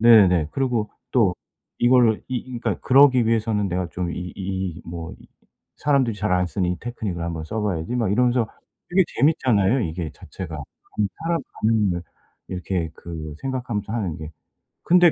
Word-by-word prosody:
네네. 95 -9 +6
그러고 125 -6 0 0.2
또 105 -8 +4 0.4
이걸 120 -3 +4
이 130 - -1
이 125 0 -7
그니까 - - -1
그러기 130 -3 +6
위해서는 110 -3 +1
내가 90 0 -1
좀 90 +3 -3
이 90 +1 -5
이 95 -3 -3
뭐 85 -1 -6
이 - - -17 0.5
'사람들이 135 -6 +2
잘 105 -1 0
안 90 0 +3
쓰는 90 0 -1
이 90 - -3
테크닉을 110 -8 -4
한번 85 -2 -3
써 110 +8 -3
봐야지.' 95 +2 -1
막 115 -5 +1
이러면서 120 0 +3 0.4
되게 190 +2 +5 0.2
재밌잖아요 130 - +3
이게 80 -2 -3
자체가. 85 -4 -8
다른 100 +7 -4
사람 165 +1 +1 0.2
반응을 105 -6 +2 0.5
이렇게 90 -2 -2
그 80 -3 -7
생각하면서 120 -6 -3
하는 100 -9 -2
게. 80 0 -7 0.5
근데 175 -1 +6
105 Hz, 335 characters per minute, -23 LUFS, 90-120 Hz, 0.5 s, 네네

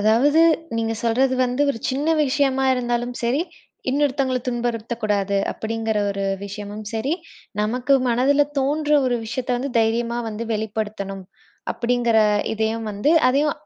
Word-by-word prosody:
அதாவது 245 +9 +4 0.4
நீங்க 225 0 0
சொல்றது 260 +3 +2
வந்து 250 +3 0
ஒரு 225 - -4
சின்ன 280 +4 -2 0.2
விஷயமா 270 -1 +1
இருந்தாலும் 240 0 -2
சரி, 245 +6 +1 0.5
இன்னொருத்தங்கள 275 -2 +1
துன்புறுத்தக்கூடாது 225 -4 -1 0.2
அப்பிடிங்கிற 225 -1 -2
ஒரு 200 0 -3 0.2
விஷயமும் 205 +1 -7
சரி, 230 +7 -1 0.5
நமக்கு 245 +5 +1
மனதில 265 +5 +3 0.2
தோன்ற 295 +3 0 0.2
ஒரு 245 -1 +1
விஷயத்த 250 +3 -3
வந்து 270 +3 -3
தைரியமா 230 +1 +1
வந்து 220 +1 -5
வெளிப்படுத்தணும், 210 -3 -4 0.5
அப்பிடிங்கிற 235 -1 +1 0.3
இதையும் 220 +1 -1
வந்து, 205 +10 +2 0.2
அதையும் 285 +3 +2
235 Hz, 125 wpm, -22 LUFS, 220-260 Hz, 0.5 s, அதாவது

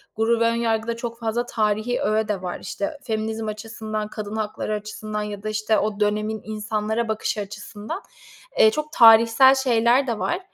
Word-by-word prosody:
Gurur 225 +1 +2
ve - - +4
Önyargı'da 230 0 0
çok 235 0 -6
fazla 230 +1 -1
tarihî 215 +2 0
öğe 215 +1 +1
de 205 -3 -2
var. 180 -1 -5
İşte, 300 0 -4
feminizm 220 -1 -3
açısından, 215 0 -5
kadın 215 -1 -6
hakları 215 0 -3
açısından 210 0 -5
ya 205 -1 -6
da, 215 - -2
işte, 215 0 +1
o 210 0 -2
dönemin 215 +1 0
insanlara 215 +1 -2
bakışı 220 -1 -2
açısından. 205 - -7 0.6
Eee, 220 - +7
çok 305 +5 -4
tarihsel 230 +3 +7
şeyler 250 0 +3
de 230 -3 -2
var 355 - -1
220 Hz, 165 wpm, -23 LUFS, 215-230 Hz, 0.6 s, Eee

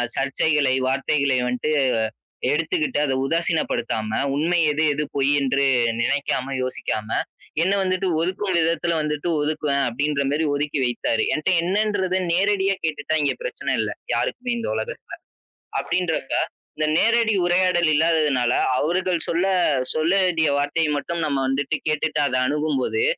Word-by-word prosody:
சர்ச்சைகளை, 140 0 +1
வார்த்தைகளை 135 0 +1
வந்துட்டு 125 +5 -1 0.8
எடுத்துக்கிட்டு 155 -1 0
அத 135 - 0
உதாசீனப்படுத்தாம, 120 -9 -1 0.2
உண்மை 170 +4 +1
எது, 150 +2 0
எது 150 - -1
பொய்யென்று 140 0 +2 0.4
நினைக்காம, 135 0 -1
யோசிக்காம, 110 -4 -3 0.5
என்ன 190 - +2
வந்துட்டு 185 0 0
ஒதுக்கும் 185 +2 -1
விதத்துல 165 +1 +1
வந்துட்டு 150 +2 -2
ஒதுக்குவேன் 145 -2 0
அப்டின்ற 140 +3 -1
மாரி 155 +2 0
ஒதுக்கி 145 0 -1
வைத்தாரு. 115 -2 0
என்ட்ட 155 +4 -2
என்னன்றத 190 0 0 0.2
நேரடியா 195 +1 +2
கேட்டுட்டா 155 0 -2
இங்க 145 - +1
பிரச்சன - - -3
இல்ல. - - -1 0.2
யாருக்குமே 245 -1 -2
இந்த 230 - -3
உலகத்தல. 110 0 -6 0.6
அப்டின்றப்ப, - - -1 0.4
இந்த 155 0 0
நேரடி 230 +1 +3
உரையாடல் 175 -2 +3
இல்லாததுனால, 150 -6 +2 0.3
அவர்கள் 175 +2 0
சொல்ல 170 +3 +1 0.5
சொல்ல 160 +4 +2
வேண்டிய 165 -3 +2
வார்த்தை 145 +3 0
மட்டும் 170 +3 -3
நம்ம 140 -2 -1
வந்துட்டு 140 +3 -1
கேட்டுட்டு 155 0 0
அத 130 - -2
அணுகும்போது, 150 - 0
155 Hz, 125 wpm, -22 LUFS, 140-175 Hz, 0.8 s, நேரடி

